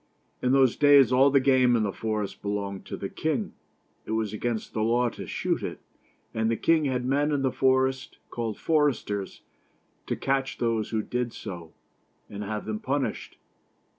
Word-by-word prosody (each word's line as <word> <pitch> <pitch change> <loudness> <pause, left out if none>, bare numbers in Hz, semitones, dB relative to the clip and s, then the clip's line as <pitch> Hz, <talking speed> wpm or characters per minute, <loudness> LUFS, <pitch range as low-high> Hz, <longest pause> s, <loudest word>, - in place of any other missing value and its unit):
In 125 - +1
those 135 -3 +4
days 145 -3 +6
all 130 +2 +5
the 140 0 +4
game 130 -2 +4
in 115 - +2
the 100 -2 -1
forest 110 -3 -3
belonged 100 -1 -4
to - - -5
the - - -4
king; - - -2 0.5
it 110 - -5
was 110 -2 -1
against 110 +1 -3
the 110 - -1
law 120 +2 +2
to - - -9
shoot - - -1
it; - - -5 0.5
and 110 0 0
the 115 - 0
king 160 -2 +3
had 125 -2 -1
men 145 +3 +1
in 140 -2 0
the 130 - +2
forest, 130 0 +1
called 115 -3 -3
foresters, 140 -11 0 0.6
to - - -1
catch 135 0 -1
those 115 -3 0
who 110 -1 -1
did 125 0 -2
so 85 -6 -8 0.6
and 100 0 -6
have 105 +1 -4
them 110 0 -3
punished. 135 +3 -3
120 Hz, 175 wpm, -27 LUFS, 110-135 Hz, 0.6 s, days